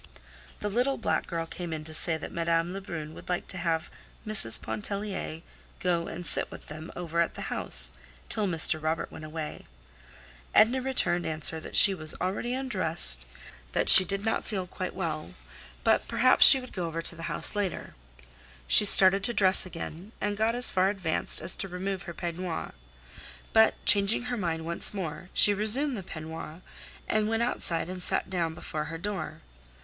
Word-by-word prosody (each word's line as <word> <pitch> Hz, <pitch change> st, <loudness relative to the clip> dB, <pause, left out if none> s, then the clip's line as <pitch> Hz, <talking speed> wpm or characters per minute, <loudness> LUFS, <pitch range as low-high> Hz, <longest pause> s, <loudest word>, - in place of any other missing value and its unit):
The 210 Hz, -, -3 dB
little 250 Hz, +6 st, -1 dB
black -, -, -2 dB
girl 165 Hz, -2 st, -4 dB
came 175 Hz, +1 st, -8 dB
in 155 Hz, -1 st, -6 dB
to 155 Hz, +1 st, -7 dB
say 160 Hz, +1 st, +3 dB
that 160 Hz, -, -9 dB
Madame 170 Hz, +1 st, -2 dB
Lebrun 165 Hz, -6 st, -8 dB
would -, -, -14 dB
like 180 Hz, -, -3 dB
to 185 Hz, -, -4 dB
have 165 Hz, -2 st, -3 dB, 0.3 s
Mrs. 200 Hz, -, +2 dB
Pontellier 200 Hz, -5 st, -6 dB, 0.4 s
go 170 Hz, -2 st, -2 dB
and 175 Hz, +1 st, -8 dB
sit -, -, 0 dB
with -, -, -13 dB
them 155 Hz, +2 st, -10 dB
over 170 Hz, -1 st, -3 dB
at 170 Hz, -, -2 dB
the -, -, -6 dB
house -, -, +8 dB, 0.3 s
till 210 Hz, -2 st, -2 dB
Mr. 160 Hz, -2 st, +1 dB
Robert 160 Hz, +1 st, -3 dB
went 155 Hz, -, -10 dB
away. 155 Hz, 0 st, -8 dB, 0.9 s
Edna 235 Hz, +5 st, +4 dB
returned 250 Hz, -9 st, -1 dB
answer 160 Hz, 0 st, -2 dB
that -, -, -10 dB
she 195 Hz, -2 st, +7 dB
had 155 Hz, -3 st, -1 dB
already 195 Hz, +6 st, -3 dB
undressed, 165 Hz, -, +1 dB, 0.5 s
that -, -, 0 dB
she 190 Hz, -, +11 dB
did 200 Hz, +2 st, -4 dB
not 225 Hz, -, -1 dB
feel 195 Hz, -4 st, -5 dB
quite 185 Hz, 0 st, -7 dB
well, 155 Hz, -, -5 dB, 0.5 s
but -, -, +1 dB
perhaps 255 Hz, +1 st, +4 dB
she 270 Hz, -, +7 dB
would 255 Hz, -1 st, -12 dB
go 180 Hz, -3 st, -4 dB
over 165 Hz, 0 st, -6 dB
to 170 Hz, -, -3 dB
the 165 Hz, 0 st, -7 dB
house -, -, -1 dB
later. 200 Hz, -4 st, -4 dB, 0.7 s
She 210 Hz, -, +5 dB
started 195 Hz, 0 st, +4 dB
to 240 Hz, -, -1 dB
dress 190 Hz, -2 st, +3 dB
again, 180 Hz, +3 st, -9 dB
and 205 Hz, 0 st, -3 dB
got 220 Hz, +3 st, -1 dB
as 245 Hz, 0 st, +7 dB
far 185 Hz, +1 st, +1 dB
advanced 190 Hz, -5 st, -1 dB
as -, -, +2 dB
to 195 Hz, -, -4 dB
remove 190 Hz, +1 st, -6 dB
her -, -, -7 dB
peignoir. 175 Hz, -1 st, -6 dB, 0.8 s
But 220 Hz, 0 st, +4 dB
changing 200 Hz, +3 st, +5 dB
her 250 Hz, 0 st, -4 dB
mind 165 Hz, -5 st, -4 dB
once 170 Hz, +4 st, +5 dB
more 180 Hz, -1 st, -7 dB
she 205 Hz, -, +5 dB
resumed 240 Hz, +7 st, +3 dB
the 205 Hz, -, -6 dB
peignoir, 160 Hz, -1 st, -9 dB, 0.5 s
and 215 Hz, 0 st, -1 dB
went 225 Hz, +1 st, -1 dB
outside 170 Hz, -9 st, -1 dB
and 185 Hz, 0 st, -8 dB
sat 190 Hz, -, +2 dB
down 165 Hz, -3 st, -3 dB
before 155 Hz, -1 st, -6 dB
her 165 Hz, +1 st, -7 dB
door. 170 Hz, -4 st, -6 dB
180 Hz, 180 wpm, -27 LUFS, 165-205 Hz, 0.9 s, she